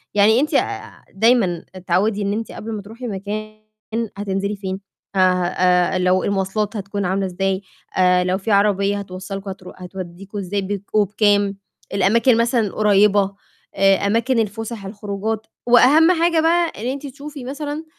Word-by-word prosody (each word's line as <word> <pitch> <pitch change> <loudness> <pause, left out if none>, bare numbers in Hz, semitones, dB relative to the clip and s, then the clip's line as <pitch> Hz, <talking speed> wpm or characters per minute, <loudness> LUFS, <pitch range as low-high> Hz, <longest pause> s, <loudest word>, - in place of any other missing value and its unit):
يعني 215 +4 +5
أنتِ 300 - 0
آآ - - +7
ع - - -7
دايمًا 195 -5 +2
اتعوّدي 185 +4 0
إن 200 - 0
أنتِ 225 +1 -4
قبل 225 +1 -7
ما 210 - -4
تروحي 230 +5 -8
مكان، 215 +1 -5 0.6
هتنزِلي 200 0 -2
فين 190 -1 -4 0.4
ه - - +1
ه 185 -1 +3
آآ 180 0 +2
لو 185 0 +2
المواصلات 200 +2 -1
هتكون 200 0 -3
عاملة 190 +2 0
إزاي 190 +1 -1 0.4
آآ 180 -1 +4
لو 185 +1 +1
في 205 +3 -3
عربية 200 0 +2
هتوصّلكم 195 +1 -7
هترو 185 -1 -10
هتودّيكم 185 +2 -8
إزاي، 200 +1 -2
بيتكم 200 +2 -2
وبكام؟ 205 0 +2 0.4
الأماكن 225 +5 +3
مثلًا 235 +1 +2
القريّبة، 200 -1 +3 0.4
آآ، 195 0 +5
أماكن 230 +4 +1
الفسح، 225 0 -3
الخروجات 210 +2 -4 0.2
وأهَم 290 +8 +6
حاجة 335 -1 +3
بقى 335 +1 +2
إن 235 - -3
أنتِ 280 +2 -4
تشوفي 280 +1 -9
مثلًا 290 +3 -5
200 Hz, 155 wpm, -20 LUFS, 190-225 Hz, 0.6 s, آآ